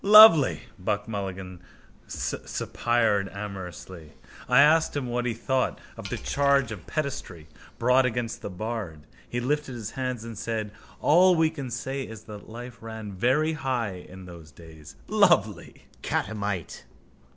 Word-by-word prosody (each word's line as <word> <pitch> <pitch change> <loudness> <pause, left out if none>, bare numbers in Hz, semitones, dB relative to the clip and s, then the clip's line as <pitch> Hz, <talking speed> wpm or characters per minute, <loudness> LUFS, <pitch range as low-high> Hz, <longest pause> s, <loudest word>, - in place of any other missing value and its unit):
—Lovely! 210 - +8 0.2
Buck 100 +3 -2
Mulligan 95 -4 -5 0.5
suspired 115 -4 0
amorously. 95 -5 -8 0.4
I 125 +1 +6
asked 155 +1 +5
him 140 - -2
what 120 0 -1
he 115 - -1
thought 130 +2 0 0.2
of - - -7
the - - -3
charge 140 -3 +2
of 105 -5 -8
pederasty 130 - -4 0.3
brought 125 +2 +4
against 120 -1 -3
the - - -5
bard. 100 -6 -5 0.2
He 120 - -2
lifted 140 +1 -1
his 115 -2 -6
hands 125 -3 -3
and 115 -1 -7
said: 110 -1 -3 0.3
All 180 +4 +6
we 160 -1 +3
can 140 -5 -6
say 135 +3 -3
is 110 -4 -8
that 105 -1 -11
life 120 +2 -9
ran 110 -2 -7
very 130 +11 +2
high 120 - -2
in 95 0 -11
those 85 -4 -12
days. 80 -3 -14
Lovely! - - +2 0.2
Catamite. 100 -5 -3
115 Hz, 140 wpm, -26 LUFS, 100-130 Hz, 0.5 s, Lovely